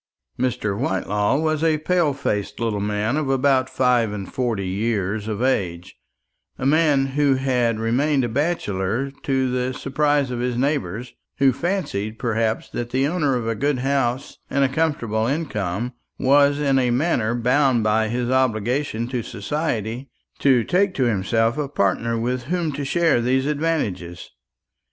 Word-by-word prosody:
Mr. 120 -5 -1
Whitelaw 105 +1 0
was 155 0 0
a 160 -2 +3
pale 170 0 +1
faced 105 -7 -3
little 115 -3 -1
man 105 +5 -1
of 150 -3 -1
about 135 -1 +2
five 125 -4 +2
and 100 -2 -6
forty 115 -7 -1
years 105 +1 -1
of 110 +2 -2
age; 90 -9 -1 0.6
a - - -4
man 145 -2 +3
who 140 0 +2
had 125 -4 +1
remained 135 +5 +1
a - - 0
bachelor 125 - -1
to 130 -2 0
the 125 0 -1
surprise 145 -1 +1
of 120 - -3
his 125 0 -1
neighbours, 125 - -2 0.2
who 135 -2 +4
fancied, 140 - -2
perhaps, 115 -1 -1
that 120 0 -5
the 130 +2 +1
owner 150 -5 +1
of 120 -2 -2
a 115 - +1
good 140 +5 0
house 130 -1 -1
and 140 - +1
a 135 - +3
comfortable 125 -7 0
income 120 - -2 0.2
was 140 +1 +4
in 135 -2 +2
a 125 -1 +1
manner 120 -4 +1
bound 125 0 +2
by 110 +1 +2
his 120 +2 -2
obligation 125 0 0
to 125 -1 -2
society 120 +1 -3 0.3
to 130 -4 +4
take 185 - +1
to 135 - +1
himself 115 +3 +1
a 145 - -1
partner 115 -1 0
with 125 +2 -2
whom 170 +1 -1
to 145 0 -4
share 160 -2 +2
these 130 +2 +1
advantages. 140 - -2
125 Hz, 155 wpm, -22 LUFS, 110-140 Hz, 0.6 s, who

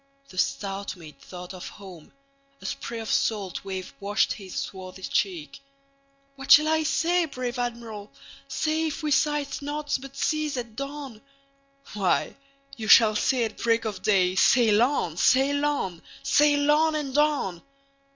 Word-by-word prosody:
The 185 - -14
stout 195 0 -2
mate 160 -4 -14
thought 180 0 -9
of 185 - -8
home; 185 -6 -13 0.5
a - - -13
sprayOf 230 -1 -5
salt 200 -5 -1
wave 190 -1 -6
washed 205 +2 +1
his 195 -3 -10
swarthy 190 0 -6
cheek."What 275 - -6
shall 305 +1 +8
I 315 0 +2
say, 340 +3 +1
brave 250 -4 -5
Admiral, 230 -4 -5 0.4
say, 315 +1 -1
If 310 +1 -5
we 300 - -1
sight 295 0 +1
naught 290 +1 -3
but 275 0 -11
seas 305 -2 -1
at 235 -3 -6
dawn?""Why, 275 -3 -5 0.4
you 220 -4 -6
shall 215 0 +7
say 245 +3 +1
at 220 -1 -4
break 230 -1 +1
of 215 -2 -4
day,'Sail 205 +3 +4
on! 240 - 0
sail 275 +9 +3
on! 190 - -2 0.2
sail 290 0 +3
on! 310 +1 +3
and 280 -3 -3
on! 290 - +1
260 Hz, 140 wpm, -26 LUFS, 205-290 Hz, 0.5 s, shall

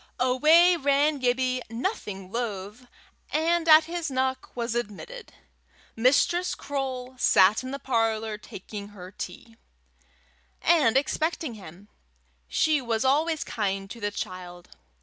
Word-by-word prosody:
Away 310 +8 +5
ran 285 0 +2
Gibbie, 255 0 0
nothing 215 - -4
loath, 220 0 -5 0.4
and 330 +2 +1
at 310 +1 +9
his 335 0 -4
knock 260 0 -2
was 235 -2 -2
admitted. 240 - -6 0.6
Mistress 285 +9 +2
Croale 260 -2 -4
sat 195 0 +5
in 255 - -7
the 275 - -4
parlour, 225 -4 -1
taking 205 0 -9
her 190 -3 -11
tea, 225 +5 -9 1.0
and 290 -8 +3
expecting 310 0 -1
him. 195 -1 -13 0.6
She 310 - +2
was 235 0 -1
always 310 +4 +2
kind 195 -2 -3
to 235 - -8
the 205 -1 -1
child. 180 -3 -7
250 Hz, 120 wpm, -26 LUFS, 210-295 Hz, 1.0 s, at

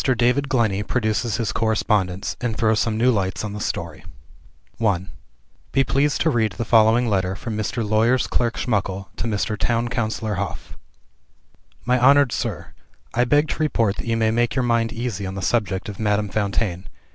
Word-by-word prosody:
DAVID 130 +2 +2
GLENNEY 110 -6 +1
PRODUCES 110 -1 -1
HIS 110 -3 -1
CORRESPONDENCE, 105 -4 0
AND 115 -3 -2
THROWS 110 -1 +2
SOME 110 -1 0
NEW 125 +3 +4
LIGHTS 95 -4 -1
ON 105 - -5
THE 105 - -5
STORY - - -4 0.8
I 95 -4 +1 0.7
Be 135 - +3
pleased 140 +3 +1
to 160 - +3
read 110 -5 +1
the 115 +5 -4
following 115 +2 +4
letter 95 -3 0
from 110 +2 -5
Mr. 110 +1 -2
Lawyer's 115 +4 +3
Clerk 120 -1 -1
Schmuckle 100 -4 -2
to - - -3
Mr. 105 0 -1
Town 115 +3 0
Councilor 110 -2 -2
Hof: 100 - -6 1.1
"My 125 0 +2
honored 140 0 +5
Sir, - - -4 0.4
I 125 - +2
beg 145 +4 +3
to - - -4
report 115 -10 +1
that - - -6
you 115 0 +1
may 110 -1 +2
make 120 +1 +1
your 130 - +1
mind 115 -1 +1
easy 115 -4 -4
on 95 - -5
the 100 - -4
subject 100 -5 0
of 105 -2 -7
Madame 105 -1 0
Fontaine. 100 -3 -2
110 Hz, 180 wpm, -22 LUFS, 105-120 Hz, 1.1 s, honored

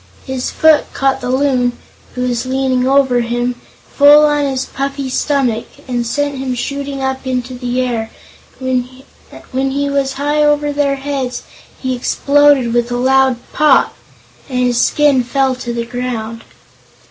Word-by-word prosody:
His 260 -1 -3
foot 315 -1 +3
caught 270 0 +1
the 250 - -3
Loon 255 -2 +1 0.4
who 250 - -2
was 245 +1 -2
leaning 260 -1 0
over 265 -2 +3
him 240 +1 -1 0.4
full 295 +1 +7
on 295 -1 +1
his 265 -1 -2
puffy 275 0 -4
stomach, 255 -5 0 0.2
and 240 -2 -2
sent 285 +2 -2
him 260 -1 -2
shooting 280 +2 -4
up 265 0 -3
into 250 0 -2
the 245 0 -2
air. 230 -3 -2 0.5
When 260 -1 0
he 265 +2 -5
was 275 -1 0
high 290 +2 0
over 295 0 +2
their 285 -1 +1
heads 270 -3 -4 0.4
he 260 -1 -2
exploded 280 -1 +3
with 240 0 0
a 245 - -1
loud 265 0 +3 0.2
"pop" 300 -3 +3 0.5
and 255 - -3
his 245 -1 +2
skin 290 -3 +3
fell 265 +1 +1
to 250 -1 -5
the 235 0 -3
ground. 230 -2 -5
265 Hz, 150 wpm, -16 LUFS, 245-280 Hz, 0.5 s, full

